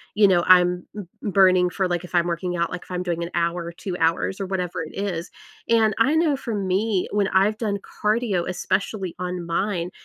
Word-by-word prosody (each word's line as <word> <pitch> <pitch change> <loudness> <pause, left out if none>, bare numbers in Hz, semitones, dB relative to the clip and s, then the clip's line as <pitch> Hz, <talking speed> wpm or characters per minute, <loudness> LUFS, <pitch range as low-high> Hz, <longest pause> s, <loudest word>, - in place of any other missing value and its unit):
you 205 -1 +6
know, 180 -2 +4
I'm 180 -1 +5
m 200 -4 -6 0.2
m 205 - -2
burning 185 -2 +5
for 190 +1 -1
like, 175 0 -2
if 180 - -7
I'm 170 - +3
working 175 +1 -2
out, 170 0 -1
like, 180 - -5
if - - -17
I'm 180 0 -2
doing 170 -1 -2
an 170 - -4
hour 170 0 0
or 170 - -6
2 180 +1 -6
hours 165 +4 0
or 195 - -3
whatever 180 -3 -3
it 155 - -10
is. 190 -4 -3 0.4
And 225 -2 +4
I 280 +7 +3
know 320 -3 +3
for 235 -4 -4
me, 195 0 0
when 205 -1 +1
I've 205 +3 +2
done 205 -3 -1 0.3
cardio, 210 -5 +1
especially 190 0 -2
on 180 -1 -4
mine, 175 0 -1
185 Hz, 220 wpm, -23 LUFS, 175-205 Hz, 0.4 s, you